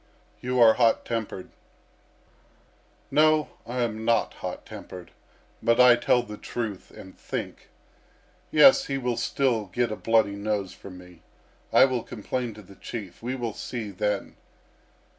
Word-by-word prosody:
"You 125 0 -2
are 115 -2 +8
hot 115 -1 +2
tempered." 110 -5 -4 1.6
"No, 155 0 +4 0.2
I 125 +1 -2
am 110 -1 -3
not 115 0 +1
hot - - -7
tempered, 90 -2 -10 0.5
but 115 +1 +2
I 125 -1 +8
tell 120 0 +2
the 105 -3 -9
truth 110 -5 -5
and 95 - -13
think. - - -6 0.8
Yes, 270 - +6
he 135 - -2
will 125 -2 -1
still 115 -1 0
get 115 +5 -1
a - - -2
bloody 110 -3 +2
nose 100 -2 -2
from 95 -2 -11
me. 90 -2 -15 0.5
I - - +7
will 130 -3 -1
complain 120 +1 -4
to 105 - -12
the 100 +1 -16
Chief. 100 -7 -8
We 125 +3 -3
will 120 -4 -4
see 110 -3 -6
then!" 100 +1 -2
115 Hz, 145 wpm, -26 LUFS, 100-125 Hz, 1.6 s, are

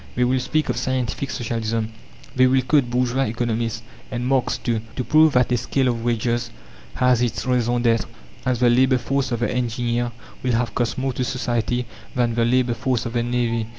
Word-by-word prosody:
They 125 - +2
will 130 +1 +2
speak 155 +5 0
of - - 0
"Scientific 130 +1 -2
Socialism"; 115 -1 -2 0.4
they 130 0 +5
will 130 0 +3
quote 135 -2 +2
bourgeois 125 +2 +1
economists, 115 0 -2 0.3
and 125 0 -3
Marx 130 -1 +1
too, 115 -3 -1
to 125 - -2
prove 155 +2 +5
that 125 -1 +3
a 120 - +3
scale 130 +2 0
of 115 -2 -2
wages 120 0 0 0.5
has 125 -2 +3
its 120 +1 -1
raison 120 -1 +1
d'être, 115 -1 +2 0.4
as 125 -1 0
"the 120 - +5
labour 130 +1 +4
force" 135 +2 -1
of 120 -1 -1
the 120 - +1
engineer 120 0 -1 0.3
will 125 -1 0
have 115 0 0
cost 120 -2 -1
more 130 0 -1
to 125 - -2
society 125 -2 -1 0.3
than 120 -2 +1
the 115 0 +1
"labour 125 0 +2
force" 125 0 -1
of 115 - -4
the 120 - +1
navvy. 120 -2 -1
120 Hz, 195 wpm, -22 LUFS, 115-130 Hz, 0.5 s, they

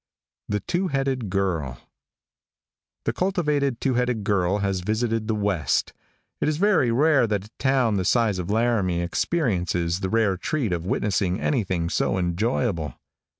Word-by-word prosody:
THE 105 0 -1
TWO 180 +2 -1
HEADED 135 - -1
GIRL 85 -10 -1 1.3
|THE - - -1
cultivated 150 -9 0
two 135 - 0
headed 125 -3 0
girl 100 -1 +1
has 100 -2 -1
visited 110 +3 -1
the 110 - 0
west. 100 -7 0 0.5
It - - 0
is 150 -1 +1
very 190 - +3
rare 135 +1 +3
that 105 -2 -1
a 105 - -17
town 130 -6 +2
the 95 - 0
size 110 -5 +2
of 90 - -4
Laramie 105 -6 +1
experiences 90 - 0
the 95 - -2
rare 110 -3 +2
treat 120 - -1
of 85 0 -3
witnessing 95 -2 0
anything 95 - 0
so 95 - 0
enjoyable. 90 - -1
105 Hz, 150 wpm, -24 LUFS, 95-125 Hz, 1.3 s, very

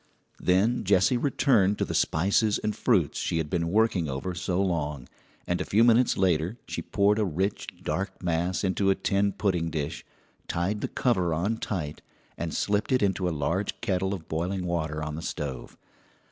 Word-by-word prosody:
Then 100 +7 +2
Jessie 100 +4 +3
returned 120 -6 +2
to - - 0
the - - -4
spices 100 +6 +2
and 105 0 -2
fruits - - +1
she - - -1
had 80 -1 -2
been 85 -2 0
working 100 -5 +2
over 70 +8 -3
so 90 +2 -2
long, 75 -8 -1 0.4
and 90 - -1
a - - +1
few 110 +3 +3
minutes 120 +1 +4
later 90 +2 +1
she - - -4
poured 105 +1 +2
a - - +3
rich, 95 +2 -2 0.2
dark 95 0 -3
mass 90 +2 0
into 95 +1 +1
a 95 - +4
tin 100 0 +1
pudding 95 -4 0
dish, 75 -3 -4 0.4
tied 95 +5 -1
the - - -1
cover 95 -10 +1
on 100 +8 0
tight, 80 -10 -4 0.3
and 85 -1 -4
slipped 105 +7 0
it 130 -4 +3
into 95 -2 +1
a 75 -3 -4
large 95 +7 -1
kettle 95 -4 0
of 85 -4 -11
boiling 90 +4 -2
water 80 -3 -2
on 75 0 -4
the 80 - -5
stove. 70 -5 -5
95 Hz, 180 wpm, -27 LUFS, 85-100 Hz, 0.4 s, minutes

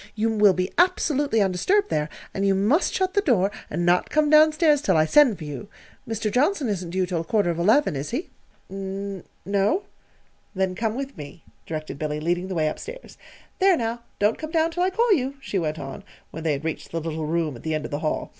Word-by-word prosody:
You 225 +1 +1
will 205 -2 +5
be 185 +1 -1
absolutely 290 - +2
undisturbed 365 - +1
there, 150 0 0 0.2
and 195 - -2
you 195 -1 +3
must 215 - +2
shut 375 0 0
the 405 - +3
door 205 - +2 0.2
and 175 +3 -2
not 175 +1 +3
come 305 -1 +2
down 310 0 +7
stairs 305 -2 +3
till 295 - +2
I 155 - +4
send 255 - +5
for 160 - -9
you. 150 +7 -7 0.4
Mr. 225 -1 -2
Johnson 290 - +1
isn't 185 -4 -3
due 185 +1 0
till 175 -2 -2
quarter 200 0 +1
of 170 - -4
eleven, 215 - +3
is 140 +2 -4
he?" 270 +9 -4 0.4
"N 195 0 -5 0.2
no." 200 - +1 0.7
"Then 190 -1 0
come 220 +3 -2
with 275 +1 -5
me," 150 +3 -10 0.2
directed 155 -3 -5
Billy, 150 -1 -2
leading 175 +3 -1
the 190 - -4
way 155 -2 +1
up 155 - -3
stairs. - - -10 0.4
"There, 380 -2 +5
now, 230 -1 -3 0.2
don't 210 +2 +1
come 310 - -5
down 325 0 +1
till 350 +2 -3
I 365 - +3
call 455 +3 +3
you," 275 -4 -1
she 210 -8 -2
went 155 -2 -2
on, 135 -3 -7 0.3
when 160 - -7
they 160 -2 +1
had 140 +2 -5
reached 165 - -4
the 165 - -3
little 160 -1 -4
room 160 -3 -1
at 115 - -11
the 160 -1 -2
end 155 - -3
of - - -7
the 145 - -2
hall. 155 -1 -2
200 Hz, 230 wpm, -24 LUFS, -, 0.7 s, down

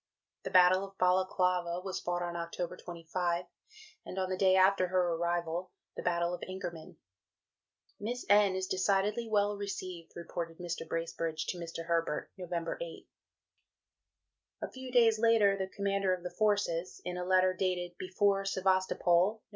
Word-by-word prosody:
The - - -5
Battle 185 +1 +6
of 195 0 -10
Balaclava 180 -1 +2
was 190 0 -4
fought 175 0 -2
on 175 0 -4
October 170 +1 -4
25; 175 0 -3 0.6
and 185 - -8
on 185 0 -1
the - - +1
day 185 0 +4
after 190 0 +4
her 180 -1 +1
arrival, 170 +1 -1 0.3
the - - -5
Battle 170 0 0
of 180 - -5
Inkerman. 180 -4 -7 1.0
"Miss 240 +4 -4
N. 205 -2 +5
is 190 0 -1
decidedly 200 +4 +1
well 205 -1 +2
received," 185 -4 -6
reported 170 -1 -5
Mr. 175 -2 -5
Bracebridge 165 -1 -3
to 180 - -3
Mr. 165 -1 -6
Herbert 165 -2 -1
(Nov. 175 -2 -4
8). - - -7 1.6
A - - -4
few 260 -1 -8
days 230 -3 +5
later, 220 -3 +4
the 190 -1 -3
Commander 195 -1 0
of 180 - -13
the 180 - -5
Forces, 200 -5 0
in 180 0 -3
a 180 - -3
letter 185 0 +3
dated 180 -2 -2
"Before 195 +1 +1
Sevastopol, 190 -1 +2
Nov. 220 - -23
185 Hz, 155 wpm, -32 LUFS, 175-195 Hz, 1.6 s, Battle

